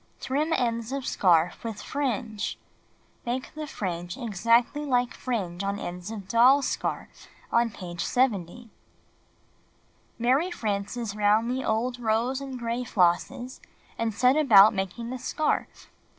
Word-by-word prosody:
Trim 295 +5 -1
ends 235 -4 0
of 275 -1 -3
scarf 175 -2 +2
with 225 -3 -5
fringe. 245 -6 -3 0.7
Make 250 +2 -4
the 310 -1 -6
fringe 175 -7 -4
exactly 235 +4 +1
Hke 250 -4 +1
fringe 195 -8 -3
on 200 0 -1
ends 180 0 -6
of 210 -4 -7
Doll's 255 +5 +5
Scarf, - - -4 0.5
page 175 -2 -5
70. 230 -3 -1 1.5
Mary 260 +9 +2
Frances 215 - -3
lound 210 +3 +2
the 260 +1 -2
old 240 +3 -1
rose 235 +4 0
and 270 -2 -6
gray 235 +1 -2
flosses, 245 +6 0 0.4
and 230 -1 -1
set 250 +5 +3
about 220 -8 +7
making 200 +5 -4
the 255 - -5
scarf. 310 +5 -2
230 Hz, 125 wpm, -26 LUFS, 200-255 Hz, 1.5 s, about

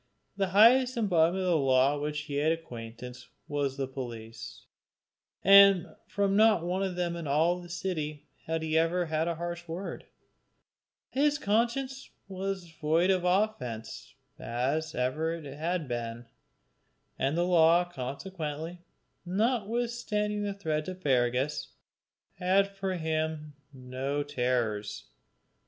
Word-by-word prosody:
The 195 -1 0
highest 240 +6 +5
embodiment 185 -4 +2
of 185 - 0
the 165 - +4
law 135 -1 +3
with 145 - -4
which 150 0 -2
he 145 -1 -5
had 155 +2 +2
acquaintance 125 -5 -7 0.2
was 145 -3 -2
the 135 - -1
police, 120 -4 -8 0.8
and 195 -3 +7
from 200 -1 0
not 215 -5 +4
one 180 +2 -1
of 190 -2 -2
them 175 -1 -1
in 170 -3 -5
all 165 +5 +2
the 175 - -12
city 155 -4 -4 0.2
had 160 0 -1
he 160 0 -1
ever 165 +2 +2
had 160 0 -1
a 170 - -1
harsh 175 +1 -5
word; 170 +4 -6 1.0
his 290 +2 +2
conscience 250 +5 -1 0.2
was 195 0 -4
as 170 - -16
void 160 +4 +2
of 185 -2 +1
offence 180 - -1 0.2
as 145 +4 -2
ever 155 +6 0
it 165 -3 -9
had 155 +3 -3
been, 120 -1 -4 0.9
and 140 +4 0
the 175 - +2
law 170 0 +5
consequently, 160 +2 -5 0.4
notwithstanding 215 +1 -1
the 205 -1 -2
threats 155 -4 -2
of 185 0 -7
Fergus, 130 -2 0 0.7
had 195 +2 +2
for 195 -1 -2
him 155 -2 -2 0.2
no 135 +2 -3
terrors. 120 -7 -1
165 Hz, 135 wpm, -29 LUFS, 145-190 Hz, 1.0 s, and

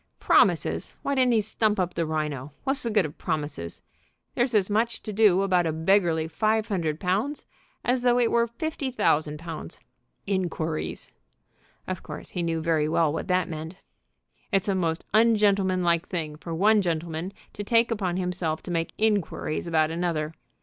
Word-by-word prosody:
"Promises! - - +2
Why 280 - 0
didn't 255 -2 +3
he 220 - +4
stump 210 0 0
up 180 -1 0
the 165 -2 -1
rhino? 150 -3 -3
What's 270 +1 0
the 235 - -2
good 210 -5 +3
of 150 - -8
promises? 145 - -4 0.5
There's 240 -1 0
as 195 -3 +3
much 225 +3 0
to 215 - -5
do 200 -3 +4
about 180 -3 +2
a - - +1
beggarly 160 0 +2
five 215 +5 0
hundred 165 -6 -1
pounds 210 +11 -1 0.4
as 250 +1 +2
though 245 0 +3
it 240 -2 +2
were 235 0 +3
fifty 275 +3 -3
thousand 150 -11 +1
pounds. 160 - -7 0.5
Inquiries!" 170 -5 -2 0.7
Of 185 -2 -4
course - - -7
he 180 - -3
knew 165 -1 -1
very 160 -2 +1
well 160 -2 +2
what - - -4
that 185 -1 +2
meant. 160 +1 -6 0.7
"It's 195 -1 +2
a 200 - +2
most 170 -3 -1
ungentlemanlike 195 -6 +3
thing 160 -4 -3
for 165 +2 -9
one 205 +6 +4
gentleman 165 0 -2 0.2
to 205 - -5
take 230 +2 +3
upon 190 -5 -1
himself 180 -3 -2
to 180 - -6
make 165 -1 -1
inquiries 205 -7 0
about 160 -1 +2
another. 165 -2 -1
180 Hz, 170 wpm, -26 LUFS, 160-215 Hz, 0.7 s, he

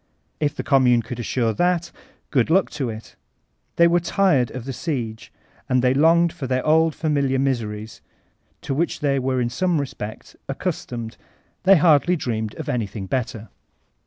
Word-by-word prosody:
If 145 -2 0
the - - -4
Commune 125 -4 +4
could 125 +1 -7
assure 115 -1 0
that, 175 +3 0 0.4
good 125 -5 +2
kKk 185 +4 +3
to 140 -5 -3
iti 110 0 -9 0.6
They 170 - +5
were 175 +1 +3
tired 170 - +2
of 125 -2 -7
the 135 - -4
siege; 120 -8 -4 0.4
and 130 -1 +2
they 125 0 +4
longed 165 +4 +4
for 150 -7 -5
their 130 0 -1
old 160 0 +3
familiar 140 -4 0
miseries 110 -5 -2 0.6
to - - -2
which 165 +5 -1
they 140 -2 +1
were 130 0 0
in 120 -1 -1
some 180 +1 +1
respect 110 -6 -7
accustomed; 115 -2 -4 0.5
they 195 +1 +8
hardly 160 +2 +4
dreamed 110 -8 -3
of - - -7
any 115 -4 -1
niing 95 -1 -7
better. 115 -4 -3
135 Hz, 165 wpm, -22 LUFS, 120-160 Hz, 0.6 s, they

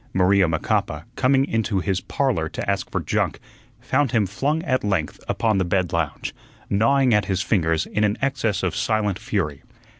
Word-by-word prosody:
Maria 95 0 +4
Macapa, 80 -1 -1
coming 135 +1 +3
into 115 -6 0
his 95 0 -1
"Parlor" - - -1
to - - -5
ask - - -1
for - - -2
junk, - - -1 0.4
found 130 +1 0
him 110 -4 +3
flung 140 - -1
at 130 -6 0
length 95 -7 -1
upon 110 -3 +1
the - - +2
bed 90 0 0
lounge, 85 -3 -2 0.4
gnawing 125 +5 +3
at 105 -2 +3
his 95 -1 -1
fingers 80 -5 +1
in 105 - -1
an 105 0 +1
excess 120 -8 0
of 95 - 0
silent 105 -3 0
fury. 100 - -2
105 Hz, 175 wpm, -23 LUFS, 90-120 Hz, 0.4 s, Maria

